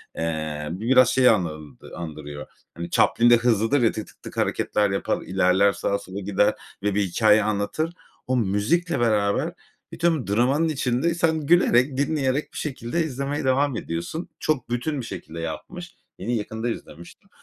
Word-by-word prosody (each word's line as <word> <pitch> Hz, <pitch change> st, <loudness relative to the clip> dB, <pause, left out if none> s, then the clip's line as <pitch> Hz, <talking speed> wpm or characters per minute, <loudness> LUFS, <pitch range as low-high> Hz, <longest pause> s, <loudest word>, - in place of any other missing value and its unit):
eee, 80 Hz, -2 st, -3 dB
bu 90 Hz, -, -5 dB
biraz 125 Hz, +1 st, +5 dB
şey 130 Hz, -1 st, +5 dB
anl 75 Hz, -, -1 dB, 0.2 s
andırıyor. 75 Hz, -3 st, -7 dB, 0.3 s
Hani, 85 Hz, +2 st, -6 dB
Chaplin 120 Hz, +6 st, +4 dB
de 120 Hz, -, +7 dB
hızlıdır 115 Hz, +3 st, +2 dB
ya, 115 Hz, -, +4 dB
tık 110 Hz, -, -6 dB
tık -, -, -20 dB
tık -, -, -10 dB
hareketler 105 Hz, -1 st, +1 dB
yapar, 95 Hz, -, -1 dB
ilerler, 95 Hz, +1 st, +3 dB
sağa, 100 Hz, -, -1 dB
sola 95 Hz, +2 st, -8 dB
gider 100 Hz, +1 st, +2 dB, 0.3 s
ve 105 Hz, -1 st, 0 dB
bir 105 Hz, -, +2 dB
hikâye 105 Hz, +3 st, +3 dB
anlatır. 110 Hz, +11 st, -1 dB, 0.3 s
O 130 Hz, 0 st, +1 dB
müzikle 125 Hz, -, +1 dB
beraber 105 Hz, -4 st, +1 dB, 0.4 s
bütün 165 Hz, -6 st, 0 dB
dramanın 130 Hz, +10 st, +2 dB
içinde, 140 Hz, +2 st, 0 dB
sen 160 Hz, -1 st, +1 dB
gülerek, 140 Hz, -5 st, +4 dB
dinleyerek 140 Hz, -1 st, 0 dB
bir -, -, -8 dB
şekilde 140 Hz, +2 st, -2 dB
izlemeye 140 Hz, 0 st, -3 dB
devam 135 Hz, +1 st, +2 dB
ediyorsun. 85 Hz, -, -5 dB
Çok 150 Hz, -7 st, -1 dB
bütün 125 Hz, +4 st, -2 dB
bir -, -, -7 dB
şekilde 85 Hz, -6 st, -8 dB
yapmış. 175 Hz, -, -7 dB, 0.2 s
Yine, 115 Hz, +6 st, -2 dB
yakında 110 Hz, +2 st, -3 dB
izlemiştim. 85 Hz, -6 st, -9 dB
115 Hz, 160 wpm, -24 LUFS, 95-140 Hz, 0.4 s, de